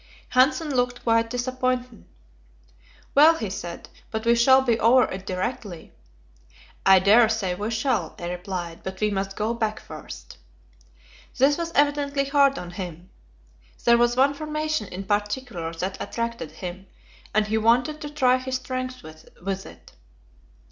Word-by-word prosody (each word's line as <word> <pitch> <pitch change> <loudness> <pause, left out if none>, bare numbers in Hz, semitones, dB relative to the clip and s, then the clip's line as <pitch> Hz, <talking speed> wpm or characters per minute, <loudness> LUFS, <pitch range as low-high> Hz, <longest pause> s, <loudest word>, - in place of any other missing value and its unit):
Hanssen 290 +4 +3
looked 245 -2 -1
quite 230 0 +2
disappointed. 255 -1 -2 1.1
"Well," 310 +4 +7
he 215 -10 -4
said, 175 -3 -7 0.2
"but 220 0 -4
we 235 - +5
shall 260 +3 +5
be 235 -3 +1
over 250 +3 +5
it 190 0 -5
directly." 185 -1 -4 0.9
"I 195 0 +7
dare 215 +5 +5
say 210 -5 -1
we 205 +4 -3
shall," 230 +4 -1
I 175 0 -5
replied; 180 -2 -5
"but 190 0 -7
we 210 0 +1
must 195 0 -3
go 220 +2 -1
back 220 -2 -2
first." - - -11 1.0
This 275 +3 +4
was 335 +1 -4
evidently 285 -1 +2
hard 275 -1 +3
on 175 - -7
him; 175 0 -8 0.7
there 235 0 +6
was 240 +1 +2
one 275 +2 +4
formation 305 -5 -2
in 185 +2 -6
particular 205 -3 -2
that 185 +3 -4
attracted 230 -8 -4
him, 185 +1 -8 0.4
and 215 0 +2
he 220 +1 0
wanted 250 +7 +2
to 295 - -5
try 255 -4 +3
his 260 0 -4
strength 255 -1 -4
with 180 +5 -7
it. - - -15
230 Hz, 150 wpm, -24 LUFS, 195-260 Hz, 1.1 s, Well